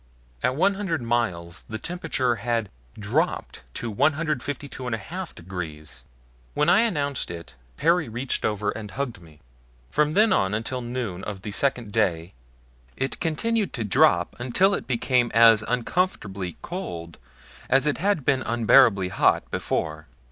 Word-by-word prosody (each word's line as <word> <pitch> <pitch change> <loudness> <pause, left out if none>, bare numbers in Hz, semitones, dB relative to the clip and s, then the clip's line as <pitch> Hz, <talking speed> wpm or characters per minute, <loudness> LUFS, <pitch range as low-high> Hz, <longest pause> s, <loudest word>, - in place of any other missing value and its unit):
At 130 - +1
one 190 +7 +3
hundred 190 -9 -2
miles 90 -9 -1
the 110 - -3
temperature 145 -7 -1
had 115 -2 -1 0.3
DROPPED - - -1
TO 120 - -4
152 145 +1 -1
1/2 160 +10 -5
DEGREES! 75 -7 -7 0.5
When 150 - +3
I 190 - +6
announced 145 - 0
it 85 -8 -8 0.2
Perry 165 -3 +2
reached 120 +4 -3
over 105 -1 0
and 105 -1 -7
hugged 120 -2 -4
me. 80 -2 -17 0.5
From 150 0 +2
then 215 +2 +5
on 95 +2 +1
until 125 +4 -3
noon 120 -7 -4
of 100 -2 -6
the 105 - -5
second 125 -1 0
day, 90 -6 0 0.6
it 135 +1 -2
continued 210 +7 0
to 120 - -2
drop 110 - +3
until 130 +11 +2
it - - -3
became 125 -1 +2
as 115 -1 +7
uncomfortably 115 - -1
cold 85 - -6 0.5
as 135 +2 +4
it 150 - 0
had 195 -6 +1
been 135 -2 +3
unbearably 115 -4 +4
hot - - +2
before. 80 0 -2
120 Hz, 140 wpm, -25 LUFS, 100-150 Hz, 0.6 s, as